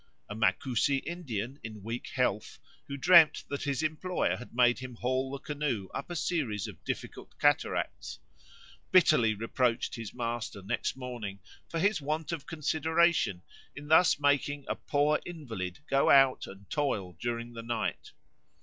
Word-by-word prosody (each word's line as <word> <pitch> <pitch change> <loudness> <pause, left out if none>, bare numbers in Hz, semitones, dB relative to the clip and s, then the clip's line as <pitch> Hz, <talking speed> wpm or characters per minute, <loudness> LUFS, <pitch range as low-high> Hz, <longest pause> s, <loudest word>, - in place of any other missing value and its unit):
A - - -6
Macusi 125 +5 +1
Indian 140 - -4
in 110 -3 -8
weak 115 +3 -5
health, 125 -5 0 0.3
who 140 - -5
dreamed 170 +1 +6
that 140 - -3
his 140 +1 -1
employer 155 +4 0
had 125 - -10
made 120 0 +4
him 130 -1 -7
haul 130 +3 -1
the 140 - -4
canoe 140 -9 -3
up 140 - -5
a 175 - -4
series 150 - -1
of - - -11
difficult - - -6
cataracts, - - 0 0.7
bitterly 155 - +5
reproached 115 +2 0
his 115 -3 -6
master 115 -4 -4
next 115 +5 -2
morning 120 -6 -6 0.3
for 165 - -3
his 200 0 +2
want 155 +2 -2
of 165 -4 -5
consideration 160 - +1 0.3
in 145 0 -9
thus 160 -1 +5
making 145 0 +1
a - - 0
poor 150 +1 +1
invalid 115 - -6
go 135 0 +3
out 135 -2 +5
and 100 0 -12
toil 105 -11 -1
during 120 +1 -3
the 115 - -6
night. 115 -1 -3
135 Hz, 150 wpm, -30 LUFS, 115-150 Hz, 0.7 s, dreamed